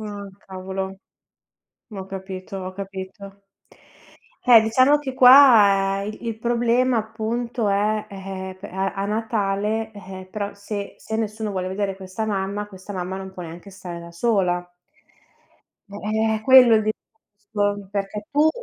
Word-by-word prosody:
Ah, 205 Hz, -2 st, -6 dB, 0.2 s
cavolo, 190 Hz, 0 st, -5 dB, 0.9 s
ho 190 Hz, -2 st, -6 dB
capito, 190 Hz, 0 st, -7 dB
ho 185 Hz, 0 st, -6 dB
capito. 195 Hz, +1 st, -8 dB, 1.0 s
Eh, 240 Hz, -2 st, +8 dB
diciamo 255 Hz, +6 st, +4 dB
che 270 Hz, -3 st, -5 dB
qua 215 Hz, -7 st, +7 dB
il 215 Hz, +1 st, -6 dB
il 230 Hz, -2 st, -3 dB
problema 240 Hz, +2 st, +2 dB
appunto 225 Hz, +1 st, -2 dB
è, 210 Hz, +2 st, +1 dB
eh 190 Hz, -1 st, -6 dB
eh, -, -, -9 dB
pe 185 Hz, -, -9 dB
a 190 Hz, +1 st, -2 dB
a 195 Hz, -, -3 dB
Natale, 215 Hz, 0 st, -1 dB
eh, 190 Hz, -2 st, -10 dB
però 205 Hz, +1 st, -4 dB
se 200 Hz, 0 st, -6 dB
se 220 Hz, -, -7 dB
nessuno 215 Hz, -1 st, -3 dB
vuole 185 Hz, -1 st, -2 dB
vedere 195 Hz, +1 st, -2 dB
questa 190 Hz, +3 st, -5 dB
mamma, 200 Hz, 0 st, -2 dB
questa 195 Hz, 0 st, -10 dB
mamma 185 Hz, 0 st, -4 dB
non 190 Hz, 0 st, -8 dB
può 180 Hz, -2 st, -8 dB
neanche 170 Hz, +4 st, -10 dB
stare 180 Hz, -3 st, -8 dB
da 170 Hz, 0 st, -10 dB
sola. 180 Hz, -2 st, 0 dB, 1.2 s
Eh 200 Hz, -, -9 dB
eh, 220 Hz, +1 st, 0 dB
è -, -, -6 dB
quello 250 Hz, -2 st, +8 dB
il 215 Hz, -, +2 dB
discorso, 205 Hz, -3 st, -4 dB
perché 205 Hz, +1 st, -4 dB
tu, 295 Hz, +2 st, +4 dB
205 Hz, 150 wpm, -23 LUFS, 190-220 Hz, 1.2 s, Eh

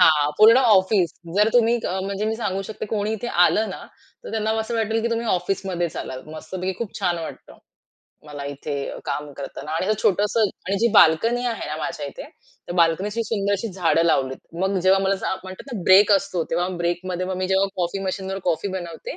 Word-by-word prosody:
हां, 150 Hz, -4 st, +5 dB
पूर्ण 225 Hz, +3 st, +8 dB
ऑफिस. 195 Hz, -, +4 dB, 0.3 s
जर 210 Hz, +2 st, +5 dB
तुम्ही 235 Hz, -1 st, +4 dB
अ, 190 Hz, -, -2 dB
म्हणजे 200 Hz, +1 st, -3 dB
मी 220 Hz, +1 st, 0 dB
सांगू 195 Hz, -4 st, -2 dB
शकते 215 Hz, +2 st, -6 dB
कोणी 210 Hz, 0 st, 0 dB
इथे 220 Hz, +2 st, -4 dB, 0.2 s
आलं 220 Hz, -, +1 dB
ना, -, -, -7 dB, 0.4 s
तर -, -, -7 dB
त्यांना 220 Hz, -1 st, -1 dB
असं 220 Hz, +2 st, -4 dB
वाटेल 225 Hz, 0 st, 0 dB
की 235 Hz, -, 0 dB
तुम्ही 230 Hz, 0 st, -1 dB
ऑफिसमध्येच 180 Hz, -2 st, -1 dB
आलात. 130 Hz, 0 st, -5 dB
मस्तपैकी 185 Hz, +4 st, -4 dB
खूप 230 Hz, -4 st, -5 dB
छान 175 Hz, -1 st, 0 dB
वाटतं. 165 Hz, -, -9 dB, 0.7 s
मला 145 Hz, -1 st, -7 dB
इथे 145 Hz, +1 st, -5 dB, 0.3 s
काम 145 Hz, 0 st, -4 dB
करताना 140 Hz, +2 st, -8 dB
आणि 165 Hz, +3 st, -1 dB
असं 215 Hz, 0 st, +1 dB
छोटसं 205 Hz, +3 st, +2 dB, 0.3 s
आणि 195 Hz, +1 st, 0 dB
जी 235 Hz, -, +3 dB
बाल्कनी 225 Hz, +7 st, +5 dB
आहे 230 Hz, -2 st, -3 dB
ना, 155 Hz, -, -3 dB
माझ्या 155 Hz, -1 st, -4 dB
इथे, -, -, -8 dB
त्या 175 Hz, -, -12 dB
बाल्कनीत 170 Hz, +4 st, +2 dB
सुंदर 205 Hz, -3 st, -1 dB
अशी 200 Hz, +3 st, -1 dB
झाडं 170 Hz, -3 st, +2 dB
लावलीत. 135 Hz, -5 st, +1 dB, 0.2 s
मग 190 Hz, 0 st, +1 dB
जेव्हा 190 Hz, +1 st, +5 dB
मला 195 Hz, 0 st, +2 dB
असं 190 Hz, -, -2 dB
म्हणतात 190 Hz, +8 st, -9 dB
ना 210 Hz, -, -4 dB
ब्रेक 200 Hz, +2 st, +7 dB
असतो, 195 Hz, -3 st, +1 dB
तेव्हा 175 Hz, +2 st, 0 dB
ब्रेकमध्ये 180 Hz, +1 st, -2 dB
मग 185 Hz, -, -3 dB
मी 185 Hz, 0 st, -1 dB
जेव्हा 190 Hz, +1 st, +3 dB
कॉफी 180 Hz, +2 st, -1 dB
मशीनवर 190 Hz, 0 st, -3 dB
कॉफी 175 Hz, +3 st, 0 dB
बनवते. 170 Hz, -2 st, -7 dB
190 Hz, 195 wpm, -23 LUFS, 170-210 Hz, 0.7 s, पूर्ण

